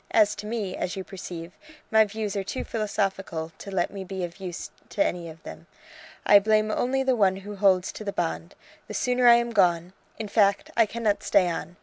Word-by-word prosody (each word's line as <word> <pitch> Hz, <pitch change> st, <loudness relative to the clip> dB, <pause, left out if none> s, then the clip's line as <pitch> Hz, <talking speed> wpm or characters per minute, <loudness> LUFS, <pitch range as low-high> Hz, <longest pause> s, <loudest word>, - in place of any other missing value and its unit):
As 210 Hz, -2 st, +4 dB
to 210 Hz, -, -6 dB
me, 210 Hz, -5 st, -3 dB
as 180 Hz, -, -3 dB
you 190 Hz, -, -4 dB
perceive, 175 Hz, -3 st, -8 dB, 0.4 s
my 220 Hz, 0 st, +6 dB
views 210 Hz, -1 st, -4 dB
are 200 Hz, -, -1 dB
too 200 Hz, +7 st, -4 dB
philosophical 195 Hz, -6 st, -2 dB
to -, -, -8 dB
let 190 Hz, -3 st, -1 dB
me 195 Hz, -1 st, -6 dB
be 190 Hz, 0 st, -5 dB
of 175 Hz, +2 st, -6 dB
use 180 Hz, -3 st, -6 dB, 0.2 s
to 200 Hz, -, +1 dB
any 170 Hz, -1 st, -3 dB
of 160 Hz, 0 st, -13 dB
them. 80 Hz, +1 st, -10 dB, 0.6 s
I 205 Hz, -, +8 dB
blame 215 Hz, +1 st, +2 dB
only 265 Hz, +4 st, 0 dB
the 260 Hz, -1 st, +2 dB
one 195 Hz, -4 st, +3 dB
who 200 Hz, +2 st, -8 dB
holds 190 Hz, -2 st, +3 dB
to -, -, -8 dB
the 200 Hz, -, -3 dB
bond. 80 Hz, -, -3 dB, 0.3 s
The -, -, -7 dB
sooner 250 Hz, 0 st, +2 dB
I 235 Hz, -, +9 dB
am 235 Hz, 0 st, 0 dB
gone! 180 Hz, -4 st, +2 dB, 0.2 s
in 220 Hz, -1 st, -4 dB
fact, 200 Hz, -1 st, +2 dB
I 230 Hz, -2 st, +4 dB
cannot 220 Hz, -2 st, -1 dB
stay 190 Hz, -3 st, +3 dB
on. 175 Hz, +1 st, -5 dB
200 Hz, 215 wpm, -26 LUFS, 180-215 Hz, 0.6 s, I